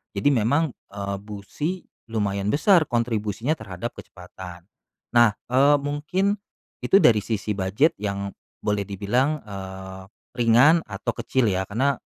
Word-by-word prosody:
Jadi 100 +9 +3
memang, 140 +5 +2 0.2
eee, 100 0 -4
busi 105 - -5 0.2
lumayan 100 -3 -1
besar 165 - +4
kontribusinya 115 +3 -1
terhadap 100 +2 -6
kecepatan. 90 -1 -11 0.5
Nah, 120 -1 +7 0.2
eee, 140 +3 +5
mungkin 155 +8 0 0.5
itu 195 - +5
dari 110 - +5
sisi 105 -1 -2
bujet 105 - +2
yang 100 -1 -3 0.3
boleh 105 -1 +1
dibilang, 120 +10 0
eee, 95 -1 -8 0.3
ringan 125 +8 +5
atau 100 0 -3
kecil 130 -2 0
ya, 95 +1 0
karena 130 +6 +1
110 Hz, 125 wpm, -24 LUFS, 100-140 Hz, 0.5 s, Nah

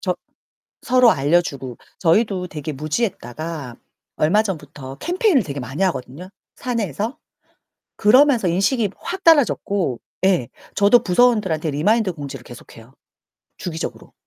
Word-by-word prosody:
저 - - -1 0.7
서로 250 -1 +5
알려주고, 140 - 0 0.2
저희도 185 +1 +2
되게 155 -1 -6
무지했다가 155 - -4 0.4
얼마 190 +8 +3
전부터 145 -8 -7
캠페인을 355 - +2
되게 140 -5 -6
많이 135 +7 -4
하거든요, 170 +1 -4 0.3
사내에서. 230 - -3 0.8
그러면서 245 -1 +4
인식이 200 +5 +1
확 380 +2 -6
달라졌고, 205 - +2 0.2
예, 180 -12 +2 0.3
저도 205 +4 +5
부서원들한테 190 -7 +2
리마인드 200 +6 +1
공지를 140 -4 -8
계속 120 -1 -13
해요 115 +3 -16 0.6
주기적으로. 165 -2 -6
180 Hz, 315 characters per minute, -21 LUFS, 145-225 Hz, 0.8 s, 서로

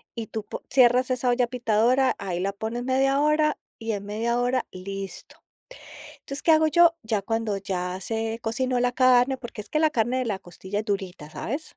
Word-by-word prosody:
y 225 -1 -5
tú 220 0 -5
po - - -7
cierras 250 0 +4
esa 250 0 0
olla 245 0 +2
pitadora, 245 +2 +2
ahí 185 -3 -3
la 195 +2 -1
pones 220 +4 -4
media 270 +1 +2
hora, 300 +1 +2 0.2
y 225 0 -3
en 200 -2 -4
media 230 +4 -1
hora, 250 +1 0
listo. 195 +1 -7 0.7
Entonces, 275 +1 -8
¿qué 325 - +5
hago 315 0 +5
yo? 340 +1 +5
Ya 220 -2 -1
cuando, 225 -2 -1
ya 185 -2 -3
se 225 +2 -3
cocinó 250 +2 0
la 245 0 +1
carne, 255 +1 +4
porque 240 -4 -8
es - - -17
que 305 - +1
la 315 -1 +3
carne 240 +2 0
de 255 - -1
la 205 -4 -2
costilla 190 +2 -5
es 215 - -7
durita, 190 -7 -4
¿sabes? 280 - -5
235 Hz, 200 wpm, -25 LUFS, 205-260 Hz, 0.7 s, qué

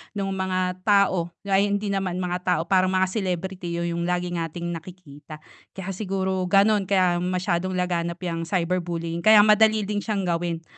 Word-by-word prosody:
nung 195 -1 -2
mga 185 -1 -2
tao 190 -4 +3 0.2
ay 195 +1 +3
hindi 205 0 -1
naman 190 -2 -2
mga 180 0 -2
tao 180 -3 +2
parang 185 -1 +3
mga 190 0 +2
celebrity 185 -3 -3
yung 170 0 -2
lagi 180 0 -1
nating 170 0 -4
nakikita. 155 -3 -10 0.3
Kaya 195 0 -5
siguro 190 -1 -2
gano'n 200 +1 +3
kaya 185 -3 +2
masyadong 180 0 -1
laganap 170 -1 -2
yang 165 -1 -3
cyberbullying 170 -2 -2
kaya 215 +2 +7
madali 215 0 +4
din 205 +1 -2
siyang 205 -2 -2
gawin, 170 -1 -2
185 Hz, 155 wpm, -24 LUFS, 170-195 Hz, 0.3 s, kaya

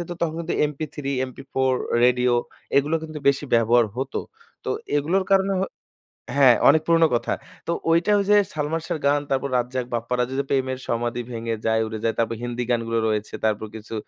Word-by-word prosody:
যেত 175 - -6
তখন 160 -2 0
কিন্তু 170 0 -3 0.2
MP3, 150 0 -7 0.2
MP4, 130 0 -1 0.3
রেডিও 125 0 +3 0.4
এগুলো 145 +3 +3
কিন্তু 155 -1 -6
বেশি 140 +1 +2
ব্যবহার 115 0 +4
হতো। 130 +1 -2 0.4
তো - - -2 0.3
এগুলোর 170 +7 +1
কারণে 195 0 +3
হ - - +1 0.7
হ্যাঁ, 130 -4 +7
অনেক 160 - +5
পুরনো 165 -1 +5
কথা। 120 - -1 0.3
তো - - 0 0.2
ঐটা 170 +5 +3
ঐযে, 205 +1 +4 0.2
সালমান 155 +2 -2
শাহর 160 - -3
গান, 145 +1 +3
তারপর 135 0 0
রাজ্জাক, 125 +1 -2
বাপ্পারাজের 125 +2 -1
যে - - +1
'প্রেমের 130 -1 0
সমাধি 120 +1 -1
ভেঙে 115 -1 -3
যায়, 110 0 +2
উড়ে 110 0 -5
যায়।' 115 - 0
তারপর 115 0 0
হিন্দি 120 0 -3
গানগুলো 115 -1 0
রয়েছে। 105 -1 -2
তারপর 110 0 0
কিছু 110 +1 -9
130 Hz, 175 wpm, -23 LUFS, 115-155 Hz, 0.7 s, হ্যাঁ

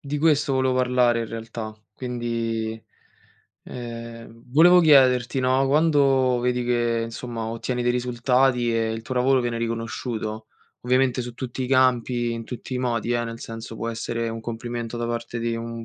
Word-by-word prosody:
di 145 -1 -4
questo 150 -3 +2
volevo 130 -1 +2
parlare 125 -2 +2
in 115 - -3
realtà. 115 -1 -6 0.2
Quindi, 115 -2 -3 0.8
ehm, 115 -1 -8
volevo 175 +4 +7
chiederti, 130 -4 +5
no, 130 +1 +2
quando 135 -4 +3
vedi 125 0 0
che, 120 -1 +1
insomma, 115 0 -5
ottieni 120 +2 -3
dei 120 - +2
risultati 125 0 +1
e 115 -1 0
il 110 0 -5
tuo 130 - -5
lavoro 130 +1 +3
viene 120 -1 -2
riconosciuto, 115 -1 -4 0.3
ovviamente 130 0 +1
su 120 -1 -7
tutti 130 +1 -5
i - - -3
campi, 125 -2 +2
in 115 0 -5
tutti 125 +2 -7
i - - -1
modi, 120 -2 -1
eh, 120 0 0
nel 115 0 -7
senso 115 0 -7
può 115 - -3
essere 115 0 -3
un 115 0 -5
complimento 120 0 -5
da 120 0 -2
parte 115 0 -4
di 115 0 -1
un 115 0 -6
120 Hz, 165 wpm, -24 LUFS, 115-130 Hz, 0.8 s, volevo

